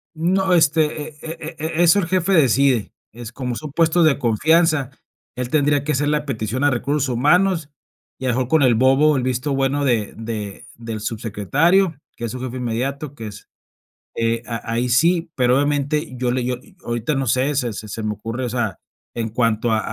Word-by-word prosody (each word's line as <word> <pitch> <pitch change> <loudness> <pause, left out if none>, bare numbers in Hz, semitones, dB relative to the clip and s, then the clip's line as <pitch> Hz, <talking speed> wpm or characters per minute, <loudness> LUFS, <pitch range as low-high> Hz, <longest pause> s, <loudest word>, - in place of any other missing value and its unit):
No, 185 +3 +1
este, 155 -2 +2
e 150 - -18
e 160 0 -7
e 160 +1 -3
e 175 - +5
eso 175 +4 +5
el 170 - -1
jefe 185 +1 +1
decide, 135 - +3 0.2
es 120 0 -9
como 125 -1 -4
son 150 +1 -7
puestos 165 +1 +3
de 150 - +3
confianza, 150 +4 +2 0.5
él 125 -1 -4
tendría 145 -1 +2
que 155 - -1
hacer 145 +1 0
la 150 0 0
petición 125 -1 -3
a 145 - +4
recursos 140 +2 -1
humanos, 160 +5 +2 0.5
y 130 - -5
a - - +1
lo 120 - +1
mejor 130 -1 0
con 160 0 +3
el 125 -3 +5
Vo. 130 +3 +4
Bo. 155 +2 +4
O 145 - +1
el 125 - -1
visto 130 +3 -1
bueno 135 +1 0
de 115 -5 0
de 110 -3 -6
del 115 -2 -6
subsecretario, 135 - +1 0.2
que 120 - -5
es 115 - -4
su 130 - -6
jefe 130 0 -5
inmediato, 130 +4 -3
que 115 -6 -8
es, 100 -1 -11 0.7
eh, 115 0 0
a 115 -1 -5
ahí 120 +2 0
sí, 165 +6 +2
pero 125 0 +3
obviamente 145 +1 0
yo 125 0 -1
le 125 0 -1
yo 125 0 -1
y - - -21
ahorita 120 +5 -2
no 135 -1 -1
sé, 130 +5 +1
se 125 -4 -1
se 110 +1 -8
se 110 +2 -5
me 105 0 -1
ocurre, 115 +5 -5
o 120 - -2
sea, 115 -4 -2 0.4
en 115 -2 -3
cuanto 115 0 +1
a 110 - +3
130 Hz, 215 wpm, -21 LUFS, 115-150 Hz, 0.7 s, e